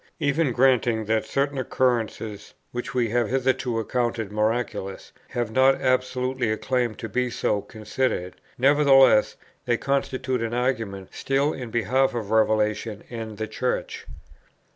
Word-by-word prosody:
Even 145 -1 +1
granting 120 -3 +2
that 110 +1 0
certain 140 0 -1
occurrences, 115 -5 -1 0.2
which 120 +1 -5
we 120 -3 +1
have 120 -1 +1
hitherto 130 -2 0
accounted 115 -2 -1
miraculous, 105 -2 -2 0.2
have 120 -2 -3
not 130 +3 +5
absolutely 130 -1 0
a 110 - -1
claim 125 -3 -1
to 115 - -6
be 125 +4 -1
so 105 -3 0
considered, 110 -4 -3 0.2
nevertheless 135 -4 +5 0.3
they 120 -1 +1
constitute 130 -2 -1
an 115 +1 -2
argument 115 -7 -2
still 140 +2 0
in 125 -3 -6
behalf 120 +4 +1
of 110 -3 -4
Revelation 110 -1 +1
and 110 -3 -6
the 110 +1 -3
Church. 125 +2 -3
120 Hz, 135 wpm, -24 LUFS, 110-130 Hz, 0.3 s, not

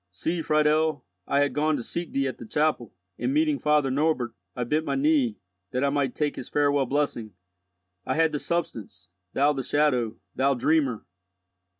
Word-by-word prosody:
See, 160 - -2
Friedel, 155 -2 +2 0.2
I 140 0 +2
had 145 - +1
gone 155 +1 +1
to - - -4
seek 170 +8 -4
thee 135 0 0
at 130 - -5
the - - -8
chapel, 150 - 0 0.3
and - - 0
meeting 305 0 +2
Father 150 -3 +2
Norbert, 140 -4 0 0.2
I 125 - -1
bent 150 +6 0
my - - -2
knee, 275 -5 +2 0.3
that 125 +5 -1
I 140 - +2
might 140 -3 0
take 150 -1 -1
his - - -7
farewell 145 -2 +2
blessing. 120 -7 -2 0.7
I - - -2
had 160 0 +3
the 150 - -2
substance, 105 - -4 0.2
thou 145 +2 +3
the 135 - -3
shadow, 130 -5 +1 0.2
thou 135 +1 +2
dreamer!" 135 -3 +1
145 Hz, 180 wpm, -26 LUFS, 130-155 Hz, 0.7 s, had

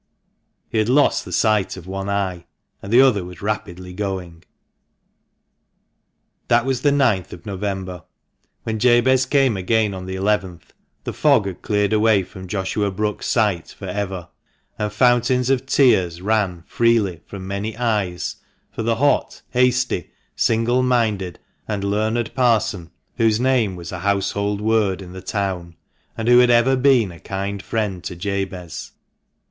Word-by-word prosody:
He 110 - -1
had 110 +2 +1
lost 145 +3 +3
the - - -9
sight 105 -4 +1
of 90 - -10
one 95 +1 -4
eye, 95 -3 -2 0.3
and 100 - -8
the 120 +3 +7
other 120 -8 +4
was 90 0 -10
rapidly 95 -4 -4
going. 90 -4 -5 2.0
That 120 +1 +3
was 130 -2 -1
the 145 - +3
ninth 120 -10 +1
of 85 - -12
November. 95 -3 -4 0.6
When 110 -1 -3
Jabez 125 +2 +4
came 135 -5 +3
again 105 +2 +1
on 95 -1 -7
the 95 - -4
eleventh, 95 -3 -2 0.3
the - - -4
fog 105 - +3
had 95 -2 -6
cleared 105 0 0
away 110 -2 +4
from 95 +1 -11
Joshua 100 +2 -1
Brookes's 105 +2 -3
sight 105 -7 0
for 100 - -8
ever; 95 -2 -4 0.5
and 105 0 -1
fountains 125 +3 +2
of 135 0 0
tears 95 -12 +3
ran 95 -4 0
freely 115 -7 +1
from 95 -2 -8
many 100 +3 -4
eyes 105 -7 -1 0.3
for - - -5
the 115 +1 +1
hot, 145 +5 +1
hasty, 125 -6 +1 0.3
single 115 +3 +2
minded, 110 -8 0 0.3
and 100 -2 -3
learned 110 +3 -1
Parson 110 -8 +1 0.3
whose 110 -2 +3
name 125 -6 +2
was 85 -1 -8
a 90 - -5
household 100 +1 -1
word 105 -4 +1
in 90 - -11
the 95 - -8
town, 90 -5 -3 0.4
and 115 0 -3
who 120 0 +7
had 125 0 +5
ever 120 +2 +4
been 130 -6 +3
a 85 - -13
kind 100 +1 -4
friend 100 -5 -3
to 90 - -5
Jabez. 95 -2 -4
105 Hz, 155 wpm, -21 LUFS, 95-115 Hz, 2.0 s, the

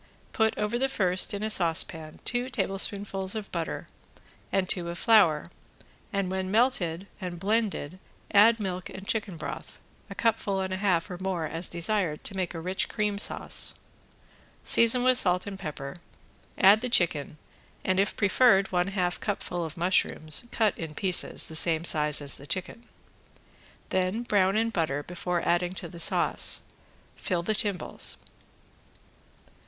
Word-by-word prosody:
Put 220 -2 +1
over 210 +3 -1
the 270 +1 +1
first 185 -7 +3
in 205 +1 -3
a 215 - 0
saucepan 165 -3 0
two 245 +1 0
tablespoonfuls 195 -3 -1
of 215 -2 -6
butter 170 -2 -4 0.6
and 190 -1 +1
two 175 -2 0
of 170 - -6
flour 170 -8 +3 0.6
and 195 -2 -2
when 190 0 -2
melted 195 -6 +1 0.2
and 175 -2 -5
blended 195 -4 -1 0.3
add 225 +3 +6
milk 185 -3 -4
and 190 +1 -10
chicken 205 -6 -2
broth, 155 - -7 0.3
a - - -8
cupful 215 -4 0
and 190 0 -2
a - - -2
half 185 -2 0
or 175 - -6
more 185 -4 -2
as 165 +3 -2
desired 170 -2 -1
to 200 - -4
make 185 -2 -3
a - - -4
rich 185 +3 -2
cream 210 -2 -1
sauce. - - 0 0.9
Season 230 +2 +4
with 255 0 +5
salt 180 -1 +2
and 195 -2 -7
pepper, 150 -5 -6 0.6
add 205 +3 +6
the 250 - -2
chicken 155 -8 +1 0.5
and, 185 0 +1
if 195 0 0
preferred, 200 -1 +4
one 180 0 +1
half 180 -3 -2
cupful 180 -4 -3
of 160 0 -7
mushrooms 170 0 +1
cut 220 -3 +1
in 160 -2 -6
pieces 185 0 +2
the 160 - -6
same 160 0 +1
size 150 -2 +3
as 140 - +1
the 140 - -11
chicken. 210 +8 -1 1.0
Then 185 +5 -1
brown 200 -3 +2
in 230 +1 +1
butter 155 -7 -1
before 175 +1 -3
adding 175 +1 +1
to 175 - -7
the 170 +1 -11
sauce. - - +2 0.5
Fill 175 -3 -2
the 215 - 0
timbales. 200 -4 -2
185 Hz, 155 wpm, -27 LUFS, 170-210 Hz, 1.0 s, add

